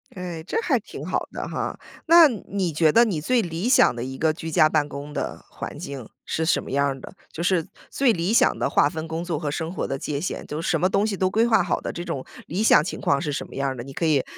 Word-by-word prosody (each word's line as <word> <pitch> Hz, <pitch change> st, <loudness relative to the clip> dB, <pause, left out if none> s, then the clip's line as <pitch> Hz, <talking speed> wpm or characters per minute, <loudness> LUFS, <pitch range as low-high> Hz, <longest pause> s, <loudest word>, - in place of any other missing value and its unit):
哎， 180 Hz, -3 st, -5 dB
这 -, -, -2 dB
还 -, -, +1 dB
挺 -, -, -9 dB
好 -, -, -2 dB
的 -, -, -5 dB
哈， -, -, -3 dB, 0.3 s
那 335 Hz, 0 st, +8 dB
你 195 Hz, -6 st, -3 dB
觉 155 Hz, +1 st, +3 dB
得 235 Hz, -, +7 dB
你 200 Hz, -9 st, -1 dB
最 240 Hz, +10 st, +2 dB
理 170 Hz, +2 st, -3 dB
想 255 Hz, -, +5 dB
的 120 Hz, -1 st, -5 dB
一 130 Hz, +1 st, -6 dB
个 160 Hz, +2 st, +2 dB
居 165 Hz, 0 st, -6 dB
家 155 Hz, 0 st, +4 dB
办 150 Hz, -2 st, +1 dB
公 145 Hz, +1 st, -7 dB
的 -, -, -4 dB
环 -, -, -7 dB
境 135 Hz, -5 st, -7 dB, 0.2 s
是 160 Hz, -, -1 dB
什 170 Hz, -, +2 dB
么 -, -, -8 dB
样 140 Hz, +1 st, +2 dB
儿 135 Hz, -1 st, -3 dB
的？ -, -, -10 dB, 0.2 s
就 170 Hz, -, -5 dB
是 175 Hz, -3 st, +1 dB, 0.2 s
最 265 Hz, -4 st, +2 dB
理 175 Hz, +2 st, -1 dB
想 235 Hz, -, +4 dB
的 -, -, 0 dB
划 145 Hz, -, +4 dB
分 160 Hz, +1 st, -5 dB
工 160 Hz, +1 st, -3 dB
作 170 Hz, -4 st, -2 dB
和 150 Hz, -2 st, -3 dB
生 165 Hz, +3 st, -3 dB
活 -, -, -2 dB
的 135 Hz, -, -3 dB
界 140 Hz, +1 st, -3 dB
限， 185 Hz, -, -4 dB
就 150 Hz, +2 st, -4 dB
是 -, -, -2 dB
什 -, -, +2 dB
么 185 Hz, -, +2 dB
东 200 Hz, +2 st, +2 dB
西 210 Hz, -3 st, -2 dB
都 185 Hz, 0 st, +2 dB
规 220 Hz, +4 st, +2 dB
划 225 Hz, -5 st, +4 dB
好 175 Hz, -, -1 dB
的， -, -, -4 dB
这 175 Hz, -, -6 dB
种 130 Hz, -, -4 dB, 0.2 s
理 185 Hz, +7 st, -1 dB
想 220 Hz, -, +6 dB
情 -, -, -5 dB
况 140 Hz, -, +2 dB
是 150 Hz, -3 st, -2 dB
什 -, -, -3 dB
么 -, -, -13 dB
样 140 Hz, 0 st, -1 dB
儿 130 Hz, -, -4 dB
的， 120 Hz, -, -6 dB
你 135 Hz, -, -10 dB
可 165 Hz, -, -2 dB
以 150 Hz, -4 st, +3 dB
165 Hz, 305 characters per minute, -24 LUFS, 145-190 Hz, 0.3 s, 那